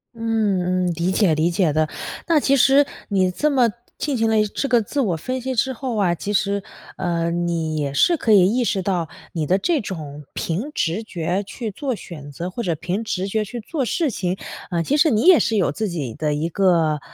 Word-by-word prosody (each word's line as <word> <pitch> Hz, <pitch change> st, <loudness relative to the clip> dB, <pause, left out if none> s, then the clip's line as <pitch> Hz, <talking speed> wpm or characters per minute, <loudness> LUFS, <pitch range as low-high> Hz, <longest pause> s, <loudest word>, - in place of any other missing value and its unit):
嗯 200 Hz, -6 st, 0 dB
嗯， 175 Hz, -, 0 dB
理 170 Hz, +3 st, -1 dB
解 190 Hz, -3 st, +3 dB
理 155 Hz, +2 st, +2 dB
解 175 Hz, -3 st, +1 dB
的。 155 Hz, 0 st, +1 dB, 0.4 s
那 330 Hz, -3 st, +4 dB
其 275 Hz, -1 st, +3 dB
实 275 Hz, +2 st, +5 dB, 0.2 s
你 190 Hz, -3 st, +2 dB
这 300 Hz, +11 st, +1 dB
么 255 Hz, -5 st, +3 dB, 0.3 s
进 290 Hz, -2 st, -1 dB
行 225 Hz, 0 st, +2 dB
了 220 Hz, -1 st, +3 dB
一 215 Hz, -, +3 dB
这 275 Hz, -, -3 dB
个 245 Hz, -2 st, +5 dB
自 285 Hz, +8 st, -3 dB
我 195 Hz, -9 st, +1 dB
分 255 Hz, +10 st, -3 dB
析 260 Hz, +1 st, -3 dB
之 260 Hz, +3 st, +1 dB
后 255 Hz, -1 st, -4 dB
啊， 190 Hz, -4 st, +2 dB
其 195 Hz, +4 st, -4 dB
实， 200 Hz, 0 st, +1 dB, 0.4 s
呃， 170 Hz, -1 st, -1 dB
你 170 Hz, -2 st, -1 dB
也 145 Hz, -2 st, -1 dB
是 345 Hz, -, +4 dB
可 230 Hz, -, 0 dB
以 190 Hz, -3 st, +7 dB
意 250 Hz, -, +2 dB
识 200 Hz, -4 st, 0 dB
到， 180 Hz, -4 st, 0 dB, 0.2 s
你 160 Hz, -4 st, -2 dB
的 185 Hz, -, +3 dB
这 330 Hz, -, +1 dB
种 150 Hz, -7 st, -7 dB
凭 200 Hz, -, -2 dB
直 180 Hz, -, -1 dB
觉 180 Hz, -2 st, -2 dB
去 220 Hz, +2 st, -6 dB
做 260 Hz, +4 st, -3 dB
选 150 Hz, -8 st, -10 dB
择， 170 Hz, +6 st, -5 dB
或 235 Hz, -, -4 dB
者 170 Hz, -5 st, 0 dB
凭 180 Hz, +7 st, -3 dB
直 195 Hz, -3 st, -2 dB
觉 215 Hz, +2 st, 0 dB
去 240 Hz, +4 st, -6 dB
做 275 Hz, +4 st, -2 dB
事 310 Hz, +3 st, 0 dB
情， 185 Hz, -3 st, -2 dB, 0.3 s
呃， 170 Hz, -1 st, 0 dB
其 285 Hz, -, +1 dB
实 310 Hz, +2 st, +5 dB
你 220 Hz, -5 st, +2 dB
也 360 Hz, -1 st, +7 dB
是 225 Hz, -, +1 dB
有 185 Hz, -, +2 dB
自 215 Hz, +8 st, -2 dB
己 145 Hz, -9 st, -4 dB
的 150 Hz, -1 st, -1 dB
一 155 Hz, +3 st, -1 dB
个 165 Hz, -4 st, +2 dB
195 Hz, 240 characters per minute, -22 LUFS, 170-235 Hz, 0.4 s, 以